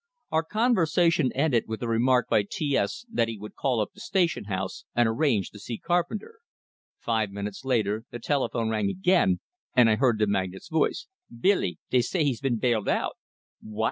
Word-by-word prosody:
Our 160 - +3
conversation 170 - +2
ended 135 -4 +2
with 110 0 -5
the 120 - -2
remark 125 +2 +2
by - - +3
T 170 - -2
S 235 - -1
that 220 - 0
he 115 -1 -5
would 105 +1 -9
call 130 -4 0
up 105 - -1
the - - -16
station 175 - 0
house 95 -1 -4
and 120 -1 +4
arrange 115 -3 +1
to 105 - -12
see 115 +3 -5
Carpenter. 180 - -2 0.6
Five 110 -3 -1
minutes 100 +3 -6
later 110 -4 0
the - - -6
telephone 120 -3 -1
rang 105 -2 0
again, 180 - +2 0.3
and 120 -3 +6
I 110 - +2
heard 125 -3 +3
the 105 - +2
magnate's 95 -2 -2
voice: 160 - 0 0.3
"Billy, 185 - +2
dey 125 - +4
say 165 +6 0
he's 135 -6 0
been 130 -4 0
bailed 115 -3 +1
out!" - - 0 0.5
"What?" 110 0 -10
125 Hz, 185 wpm, -26 LUFS, 110-160 Hz, 0.6 s, and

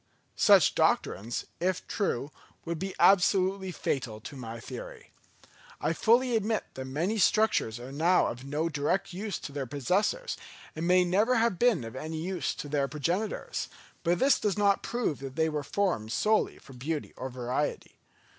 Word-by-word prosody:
Such - - +6
doctrines, 110 +6 0
if 185 +1 -1
true, 150 - -1 0.3
would 170 -1 -3
be 195 0 -4
absolutely 190 0 +4
fatal 120 -9 -3
to 140 - -9
my 115 -3 -7
theory. - - -9 0.7
I - - 0
fully 240 +2 +3
admit 220 0 0
that 130 - -6
many 170 +12 -1
structures 180 - +2
are 125 +2 -8
now 165 +6 +3
of 120 +2 -4
no 150 +4 -1
direct 160 +5 -1
use 200 +3 -3
to - - -8
their 140 -2 -4
possessors, 190 - 0 0.4
and 160 +2 -2
may 180 0 +5
never 210 +8 +3
have 230 -5 +2
been 240 - +3
of 115 +1 -8
any 155 +4 -5
use 170 -2 -2
to - - -6
their 140 -1 0
progenitors; 170 +9 -2 0.3
but 175 +1 +2
this 270 +6 +4
does 210 -2 0
not 200 -1 +3
prove 235 - -2
that 135 -1 -7
they 160 0 +2
were 150 -1 -2
formed 145 - -1
solely 215 - +1
for 135 - -15
beauty 145 +5 -4
or 130 - -5
variety. 125 +3 -3
170 Hz, 165 wpm, -29 LUFS, 140-200 Hz, 0.7 s, Such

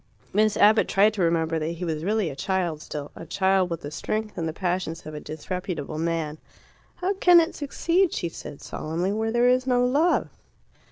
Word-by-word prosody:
Miss 215 +1 +3
Abbott 215 +1 +5
tried 205 +2 +4
to 205 - -3
remember 165 -1 +1
that 160 +2 -2
he 175 +2 -5
was 160 -2 -3
really 205 -3 0
a - - -8
child 170 +1 -1
still 145 -2 -6
a - - -8
child 190 +2 +1
with 170 -2 -4
the 145 - -7
strength 215 +7 -3
and 165 - -2
the - - -2
passions 175 -1 -3
of 155 - -7
a 150 - -5
disreputable 160 -1 -5
man. 160 -2 -2 0.6
"How 370 +2 -1
can 360 -3 +6
it 330 +1 +1
succeed," 335 +5 +1
she 170 - -2
said 145 -3 -9
solemnly, 170 +5 -3
"where 220 +2 -1
there 240 +1 +3
is 255 +1 +3
no 245 -1 +3
love?" 300 +7 +2
185 Hz, 200 wpm, -25 LUFS, 160-220 Hz, 0.6 s, can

